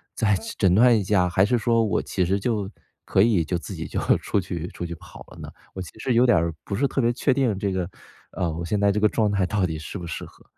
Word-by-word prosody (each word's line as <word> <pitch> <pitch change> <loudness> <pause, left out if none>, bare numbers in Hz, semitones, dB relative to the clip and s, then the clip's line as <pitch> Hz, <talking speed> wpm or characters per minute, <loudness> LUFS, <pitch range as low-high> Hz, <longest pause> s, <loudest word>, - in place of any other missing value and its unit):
再 105 -3 +2 0.2
诊 95 -3 +3
断 120 +2 +6
一 105 - -1
下？ 90 -2 +2
还 95 +3 +3
是 120 +4 +2
说 115 +1 +2
我 105 - 0
其 90 - -1
实 95 +3 0
就 105 -2 -1 0.4
可 95 - +2
以 100 -6 +3
就 85 +2 -2
自 75 - -8
己 - - -5
就 - - -3 0.2
出 - - -1
去 85 -1 -5
出 - - -8
去 85 0 -5
跑 80 - -13
了 - - -14
呢？ - - -9 0.2
我 95 - -4
其 90 - -8
实 125 +1 0
有 120 +2 +5
点 120 -5 +5
儿 85 0 -1
不 100 - -4
是 140 +6 +1
特 135 - -3
别 120 -1 +2
确 125 - +1
定 125 -6 +1
这 100 -1 -1
个 95 -2 -2 0.4
呃， 85 -3 -2
我 85 +2 -5
现 100 +4 -1
在 100 0 +4
这 105 - 0
个 105 - +4
状 105 -1 +1
态 100 -2 +1
到 100 +1 -1
底 80 -3 -1
适 80 +5 -7
不 85 - -7
适 85 - -5
合。 - - -18
100 Hz, 300 characters per minute, -24 LUFS, 90-110 Hz, 0.4 s, 断